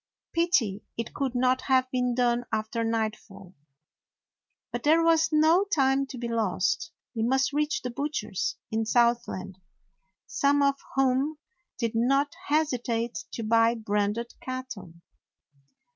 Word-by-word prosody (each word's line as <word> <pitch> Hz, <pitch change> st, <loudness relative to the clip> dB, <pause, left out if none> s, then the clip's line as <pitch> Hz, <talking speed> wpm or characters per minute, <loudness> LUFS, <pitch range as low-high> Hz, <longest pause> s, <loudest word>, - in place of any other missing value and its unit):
Pity 305 Hz, -, +1 dB, 0.2 s
it 230 Hz, 0 st, -4 dB
could 270 Hz, -3 st, -2 dB
not 255 Hz, +1 st, +2 dB
have 260 Hz, -1 st, +2 dB
been 250 Hz, -1 st, 0 dB
done 240 Hz, -1 st, +2 dB
after 220 Hz, +1 st, -1 dB
nightfall. 215 Hz, -4 st, -3 dB, 1.2 s
But 240 Hz, -, -3 dB
there 320 Hz, +4 st, +4 dB
was 325 Hz, -1 st, +4 dB
no 315 Hz, +4 st, +4 dB
time 275 Hz, -7 st, +2 dB
to 260 Hz, -, -8 dB
be 240 Hz, 0 st, -4 dB
lost. 210 Hz, -4 st, 0 dB, 0.2 s
They 225 Hz, -, -1 dB
must 265 Hz, +4 st, +1 dB
reach 300 Hz, +1 st, 0 dB
the 250 Hz, -, -3 dB
butchers 235 Hz, -8 st, -2 dB, 0.2 s
in 220 Hz, +1 st, 0 dB
Southland, 235 Hz, -6 st, +1 dB, 0.7 s
some 285 Hz, 0 st, +2 dB
of 280 Hz, 0 st, +2 dB, 0.2 s
whom 270 Hz, +3 st, +1 dB, 0.4 s
did 230 Hz, -3 st, -1 dB
not 275 Hz, +5 st, +2 dB
hesitate 245 Hz, -6 st, -1 dB
to 230 Hz, -, -4 dB
buy 230 Hz, +1 st, +3 dB
branded 210 Hz, +1 st, -1 dB
cattle. 255 Hz, -8 st, -6 dB
245 Hz, 130 wpm, -27 LUFS, 225-275 Hz, 1.2 s, there